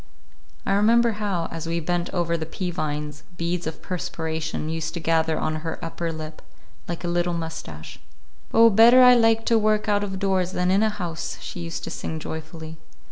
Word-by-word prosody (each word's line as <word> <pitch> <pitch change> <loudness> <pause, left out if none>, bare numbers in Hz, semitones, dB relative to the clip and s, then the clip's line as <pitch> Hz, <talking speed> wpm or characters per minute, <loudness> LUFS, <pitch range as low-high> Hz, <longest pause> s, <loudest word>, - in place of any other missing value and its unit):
I 195 - +1
remember 230 +3 +4
how, 185 -5 -1
as 165 0 -5
we 170 +1 -1
bent 175 +2 -1
over 170 -2 0
the 160 -1 -3
pea 180 +2 -3
vines, 150 -3 -4 0.2
beads 170 0 -2
of 160 - -6
perspiration 160 -3 -3
used 160 +1 -3
to - - -3
gather 160 -1 +1
on 155 0 -1
her 160 +1 -4
upper 165 0 -3
lip 155 -1 -8 0.5
like 170 0 -5
a - - -2
little 175 0 0
mustache. 160 - -7 0.5
"Oh, 230 0 +7
better 235 +5 +8
I 250 0 +9
like 225 -1 +4
to 230 -1 +4
work 215 0 +1
out 205 -1 +2
of 190 -2 -4
doors 190 -2 0
than 180 0 +1
in 195 +2 +4
a 220 - +3
house!" 175 -6 -4
she - - -7
used 170 -1 -5
to - - -5
sing 160 - -4
joyfully. 160 0 -7
170 Hz, 190 wpm, -24 LUFS, 160-200 Hz, 0.5 s, I